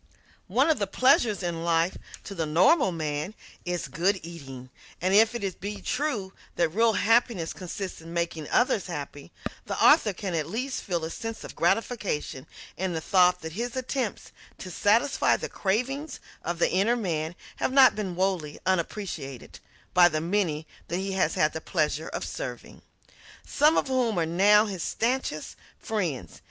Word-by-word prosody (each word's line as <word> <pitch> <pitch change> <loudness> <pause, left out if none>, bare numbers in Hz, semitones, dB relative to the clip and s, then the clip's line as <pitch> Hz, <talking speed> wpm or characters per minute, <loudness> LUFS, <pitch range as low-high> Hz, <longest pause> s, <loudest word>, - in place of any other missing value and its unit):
One 255 - +3
of 300 - 0
the 200 - 0
pleasures 230 -3 +3
in 170 -1 -2
life 170 +1 +2 0.3
to 200 - -7
the 165 -4 -2
normal 185 - +4
man 155 +3 -3 0.3
is 175 -1 -2
good 190 +4 +1
eating, 135 -7 -9 0.3
and 185 +2 +1
if 225 +3 +5
it 200 -6 -4
be 205 +1 -4
true 240 -10 -2 0.2
that 170 -2 +2
real 225 +6 +3
happiness 225 -5 +2
consists 185 0 -6
in 165 +1 -10
making 170 -3 -2
others 225 -6 +2
happy, 145 -4 -7 0.4
the - - -3
author 290 -8 +6
can 190 -1 -5
at 160 -2 -1
least 255 +7 -3
feel 175 -5 -2
a 160 - -5
sense 225 +4 -6
of - - -9
gratification 205 - -1 0.3
in 185 0 -1
the 160 - -1
thought 180 +1 +3
that 160 - -6
his 235 +7 -4
attempts 255 -3 -3 0.3
to 185 - -8
satisfy 225 +10 +3
the - - -4
cravings 265 +9 -2 0.2
of 175 +1 -3
the 170 - +2
inner 200 +7 +3
man 170 -7 -2 0.2
have - - 0
not 265 -1 +7
been 195 -4 -3
wholly 180 -5 -1
unappreciated 170 - -3 0.3
by 175 -1 +7
the 155 - -1
many 165 -3 0 0.2
that 170 - -2
he 195 +1 -3
has 185 -4 +1
had 155 - +2
the 160 - -5
pleasure 155 -2 -1
of - - -4
serving - - -7 0.6
some 300 +3 +3
of - - +1
whom 250 -5 +1
are 165 - +2
now 205 +6 +5
his 195 -5 -5
stanchest 230 - -2 0.2
friends. 165 - -3
185 Hz, 165 wpm, -27 LUFS, 165-225 Hz, 0.6 s, not